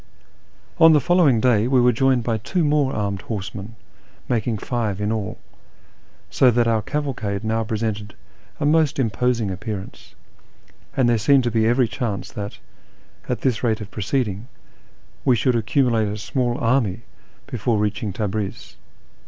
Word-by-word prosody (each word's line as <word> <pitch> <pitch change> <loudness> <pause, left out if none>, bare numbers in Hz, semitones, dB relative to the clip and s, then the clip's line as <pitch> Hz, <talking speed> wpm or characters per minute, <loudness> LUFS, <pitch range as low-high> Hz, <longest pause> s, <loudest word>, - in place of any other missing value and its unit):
On 165 -1 +8
the 150 - +5
following 170 -7 +3
day 115 -2 +3
we 130 0 +3
were 125 0 +5
joined 130 0 +2
by 115 -1 -1
two 175 - -1
more 145 -2 +2
armed 100 -2 -2
horsemen, 100 0 -6 0.5
making 115 -1 0
five 110 -3 -2
in 105 +1 -1
all, 110 -3 -3 0.9
so 130 - +5
that 120 0 +2
our 115 -1 +2
cavalcade 115 -6 -3
now 110 +1 0
pre 110 0 -3
sented 105 -1 -3 0.5
a - - 0
most 155 -1 +3
imposing 120 -3 0
appearance, 100 +1 -7 0.8
and 130 -3 +3
there 120 -2 +3
seemed 135 +4 +4
to 120 - 0
be 110 0 +2
every 120 +1 +3
chance 110 -4 -4
that, 100 -1 -6 0.7
at - - -2
this 125 -4 0
rate 110 -3 +1
of 105 -2 -8
proceeding, 105 0 -2 0.8
we 125 - +4
should 125 +2 +1
ac 115 -2 -1
cumulate 120 -6 +2
a 105 - -4
small 120 +3 -1
army 115 -3 0 0.4
before 120 -3 -1
reaching 105 0 -1
Tabriz. 105 0 -4
115 Hz, 155 wpm, -22 LUFS, 105-130 Hz, 0.9 s, On